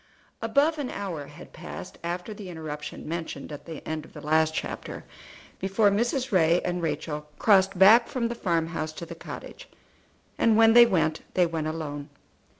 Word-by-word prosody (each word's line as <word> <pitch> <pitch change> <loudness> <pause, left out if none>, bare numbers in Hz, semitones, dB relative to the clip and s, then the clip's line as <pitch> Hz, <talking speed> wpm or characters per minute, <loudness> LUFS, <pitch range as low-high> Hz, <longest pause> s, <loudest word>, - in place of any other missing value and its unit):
Above 285 +8 +2
an 270 -3 -3
hour 175 -8 -5
had 150 +4 -13
passed - - -9
after 175 +5 -4
the 205 -3 -9
interruption 155 -3 -7
mentioned 160 -3 -5
at 145 - -8
the 160 -3 -9
end 155 -1 -3
of - - -16
the 150 - -9
last 155 +1 +2
chapter - - -5 0.5
before 195 +2 +2
Mrs. 240 +5 0
Ray 170 -2 +4
and 180 0 -1
Rachel 150 -2 -3
crossed 195 -2 +4
back 215 +6 +7
from 240 -3 -1
the 235 - -3
farm 170 -7 0
house 155 -2 -4
to 170 - -7
the 170 - -8
cottage, - - -9 0.7
and 225 -1 +4
when 225 0 +7
they 240 0 +9
went 165 -6 +1
they 180 - +5
went 165 -2 -2
alone. 150 -2 -5
175 Hz, 175 wpm, -26 LUFS, 155-215 Hz, 0.7 s, they